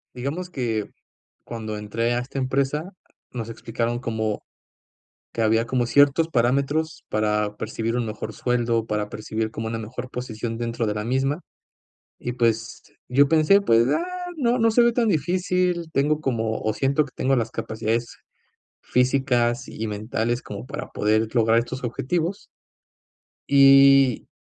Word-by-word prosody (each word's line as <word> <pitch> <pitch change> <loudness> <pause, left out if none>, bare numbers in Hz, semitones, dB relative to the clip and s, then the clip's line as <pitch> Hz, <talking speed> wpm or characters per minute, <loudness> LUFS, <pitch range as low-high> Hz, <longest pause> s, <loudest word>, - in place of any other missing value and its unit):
Digamos 150 +9 -4
que, 115 - -2 0.5
cuando 110 -2 -5
entré 115 +3 -1
a 120 - 0
esta 135 +2 -5
empresa, 140 +7 -1 0.4
nos 115 -2 -5
explicaron 115 +1 -3
como 110 -3 -2 0.9
que 115 - -2
había 110 +1 +3
como 125 0 0
ciertos 145 +5 +4
parámetros 140 +5 0
para 105 -1 0
percibir 115 +2 -2
un 120 - -1
mejor 110 0 -5
sueldo, 120 -2 0
para 105 -1 -2
percibir 110 +1 -3
como 110 0 -4
una 115 0 -3
mejor 125 +3 -7
posición 115 -2 -5
dentro 115 -1 -2
de 105 - 0
la 105 0 -3
misma 135 +7 0 0.8
y, 120 - -4
pues, 115 -2 -1 0.2
yo 140 +3 +4
pensé: 165 +6 +5
“Pues, 115 -7 +4
ah, 335 - +1 0.3
no 250 -4 +1
no 225 0 +4
se 240 - +4
ve 235 0 +5
tan 230 -1 +1
difícil, 180 0 0
tengo 150 +3 +2
como 115 -6 -1
o 110 -1 0
siento 140 +4 +1
que 130 - -14
tengo 135 +1 +1
las 115 -1 -1
capacidades 115 +2 -3 0.6
físicas 125 -2 +1
y 110 0 -5
mentales 110 +3 -2
como 65 - -8
para - - -6
poder 110 +1 +1
lograr 115 -1 +3
estos 130 +2 -2
objetivos”. 170 - -2 1.0
Y 135 -2 +6
120 Hz, 145 wpm, -24 LUFS, 110-140 Hz, 1.0 s, Y